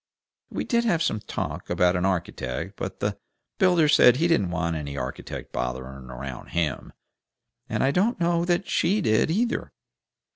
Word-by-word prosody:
We - - -3
did 235 -2 +1
have 170 -8 +2
some 110 - 0
talk - - -5
about 90 0 +3
an 90 +1 +1
architect, 85 -9 -3
but - - -6
the - - -1 0.4
builder 175 -4 +5
said 125 -4 +7
he 165 +6 +2
didn't 105 - +2
want 85 -1 -1
any 70 -2 -5
architect - - -6
bothering 65 +1 -4
around 60 0 -7
HIM, 80 -4 -2 0.8
and - - 0
I 135 - +3
don't 200 - +1
know 170 0 +2
as 175 +1 +2
SHE 200 +5 +1
did, 110 - +2
either. 230 +8 0
105 Hz, 160 wpm, -25 LUFS, -, 0.8 s, said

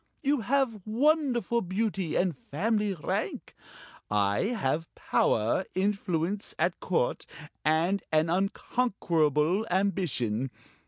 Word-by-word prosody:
You 285 0 +2
have 240 -2 +1
wonderful 240 - +2
beauty 190 -2 -1
and 180 -3 +1
family 210 - -1
rank. 150 - -3 0.6
I 100 - +2
have 165 - -1
power, 115 - +1
influence 190 -1 -1
at 170 - 0
Court, 170 -9 0 0.4
and 165 +6 +2
an 155 +1 +3
unconquerable 180 - +1
ambition. 160 - 0
185 Hz, 95 wpm, -28 LUFS, 155-220 Hz, 0.6 s, an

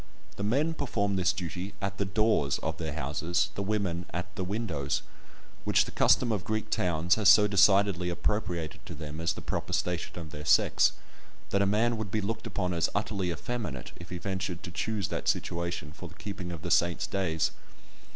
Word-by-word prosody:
The - - -6
men 140 +10 +2
perform 105 -10 -1
this 90 -1 +3
duty 90 +1 -5
at 100 0 -3
the 100 - +1
doors 95 -7 +2
of - - -2
their 80 -3 -3
houses, 80 +4 0
the - - -3
women 95 -4 -1
at 90 +4 -5
the 95 - -2
windows, 85 -9 -2 0.6
which - - +4
the - - -8
custom 120 -2 +4
of 100 -5 -1
Greek 110 +2 -2
towns 85 0 +2
has 100 - +7
so 105 - +8
decidedly 100 -3 +4
appropriated 85 -3 -2
to - - -6
them 80 0 -6
as 85 -1 +1
the - - -8
proper - - -3
station 90 -1 -1
of 80 -3 -7
their 75 +1 -7
sex, 75 - +4 0.6
that 100 - +3
a 100 - +3
man 115 +3 +2
would 110 -2 -4
be 110 - 0
looked 110 +2 -3
upon 90 -2 -1
as 85 -1 +1
utterly 100 -3 -1
effeminate 95 - -4
if 85 - -11
he 90 - -4
ventured 95 -1 -3
to 90 - -6
choose 105 +1 -2
that - - -3
situation 85 -3 -1
for - - -9
the - - -15
keeping 95 -4 -6
of 85 -4 -7
the - - -3
saints' 85 0 +3
days. 80 -5 0
95 Hz, 195 wpm, -29 LUFS, 85-105 Hz, 0.6 s, so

